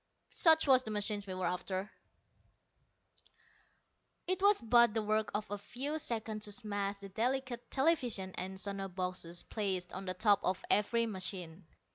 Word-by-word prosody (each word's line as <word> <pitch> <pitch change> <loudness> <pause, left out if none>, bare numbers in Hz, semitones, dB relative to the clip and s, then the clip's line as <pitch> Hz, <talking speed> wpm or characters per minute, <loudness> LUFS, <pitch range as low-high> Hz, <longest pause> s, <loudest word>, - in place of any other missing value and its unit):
Such 320 -1 +6
was 260 -3 +6
the 225 - -8
machine 210 -1 -1
we 185 - -4
were 185 -1 -2
after. 185 +3 -3 2.3
It 370 +1 -1
was 405 +1 +5
but 235 -1 +4
the 220 - 0
work 215 +1 0
of 210 0 -1
a 205 - -3
few 280 +9 -4
seconds 220 -5 -3
to 205 - -4
smash 205 -2 -3
the 200 0 -10
delicate 245 +3 -2
television 260 - +2
and 190 +1 -5
sono 195 0 -3
boxes 180 -2 -3
placed 190 -4 -3
on 190 +1 -5
the 185 0 -3
top 205 +1 +4
of 185 0 -1
every 230 +3 +3
machine. 185 -4 -6
210 Hz, 155 wpm, -33 LUFS, 190-235 Hz, 2.3 s, Such